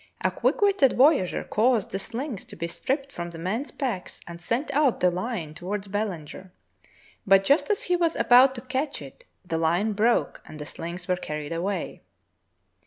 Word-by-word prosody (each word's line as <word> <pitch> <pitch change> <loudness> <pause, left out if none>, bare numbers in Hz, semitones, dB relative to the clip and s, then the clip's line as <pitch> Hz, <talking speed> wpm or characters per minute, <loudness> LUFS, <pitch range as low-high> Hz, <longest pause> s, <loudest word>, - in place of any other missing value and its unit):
A - - +1
quick - - 0
witted 390 -11 +4
voyageur 265 - +4
caused 225 -1 +1
the 195 - -2
shngs 235 +1 -4
to - - -10
be 170 - -3
stripped 275 - -2
from 175 -6 -5
the 170 - -9
men's 205 - -2
packs 235 -10 -4
and 170 0 -9
sent 245 - -1
out 280 -3 +2
the 180 - +3
hne 180 -4 -4
toward 195 +4 -5
Belanger, 190 -3 -4 0.8
but 195 0 +6
just 280 - +3
as 420 - +1
he 360 - +1
was 340 -2 +1
about 260 +2 +6
to 240 - -6
catch 265 +3 -2
it - - -12 0.2
the 165 -2 -2
hne 175 +7 +1
broke 230 +3 +1
and 155 - -10
the 150 - -7
shngs 170 +3 -6
were 180 - +2
carried 150 -2 -5
away. 180 +2 -3
205 Hz, 180 wpm, -26 LUFS, 175-265 Hz, 0.8 s, but